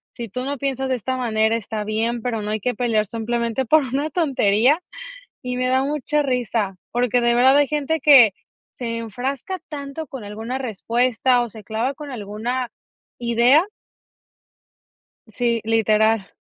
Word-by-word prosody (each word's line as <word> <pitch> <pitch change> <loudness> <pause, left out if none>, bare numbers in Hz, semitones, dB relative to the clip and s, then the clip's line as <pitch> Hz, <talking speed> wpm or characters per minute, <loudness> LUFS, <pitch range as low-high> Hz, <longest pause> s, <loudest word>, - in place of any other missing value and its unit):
si 235 -2 -6
tú 250 +6 -4
no 280 0 -3
piensas 270 -1 -2
de 260 - 0
esta 255 +2 -3
manera, 220 -2 +1
está 220 -1 -4
bien, 225 +3 -1
pero 225 -2 -2
no 210 - -3
hay 215 - -1
que 245 +4 -2
pelear 220 -3 +1
simplemente 235 +3 -2
por 310 +6 +5
una 280 +4 -2
tontería. 275 - +2 0.6
Y 250 0 -3
me 255 0 0
da 260 +1 +2
mucha 295 +1 0
risa 235 -7 -1
porque 245 0 +1
de 235 0 +3
verdad 260 +3 +5
hay 290 -1 +4
gente 300 +2 -1
que 260 -10 +7 0.4
se 230 -2 -4
enfrasca 255 - -4
tanto 290 +1 -6
con 260 -3 -8
alguna 220 +5 -5
respuesta 245 +1 +1
o 235 - -5
se 215 0 -12
clava 225 +6 -2
con 290 +1 -9
alguna 235 +2 -4 0.5
idea. 240 - +4 1.6
Sí, 235 +1 -1
literal. 220 -2 +2
245 Hz, 155 wpm, -21 LUFS, 220-265 Hz, 1.6 s, que